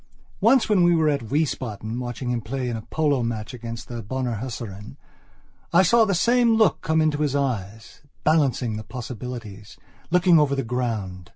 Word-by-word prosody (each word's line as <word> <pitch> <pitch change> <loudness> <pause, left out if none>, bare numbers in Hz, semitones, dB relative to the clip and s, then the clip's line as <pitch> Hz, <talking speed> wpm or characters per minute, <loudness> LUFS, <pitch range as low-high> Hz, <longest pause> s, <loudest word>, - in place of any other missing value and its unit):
Once 230 +5 +4
when 210 -4 +3
we 175 0 +5
were 160 -2 +3
at 140 -7 -2
Wiesbaden 120 -6 -2
watching 125 0 -4
him 120 -1 -1
play 125 +3 -4
in 120 - -2
a 110 - -5
polo 145 +2 0
match 115 0 -4
against 115 -1 -7
the 120 -1 -6
Bonner 120 +1 -3
Hussaren 105 -5 -7 0.7
I 175 +2 +5
saw 225 +5 +5
the 200 -3 0
same 235 +4 +3
look 220 -6 +3
come 160 0 +1
into 150 -1 +1
his 145 -2 0
eyes, 110 -6 -3 0.2
balancing 135 -8 +1
the 110 - -6
possibilities, 115 -4 -8 0.3
looking 180 -1 +5
over 140 -2 +2
the 135 - -1
ground. 110 -7 -3
125 Hz, 175 wpm, -24 LUFS, 115-160 Hz, 0.7 s, we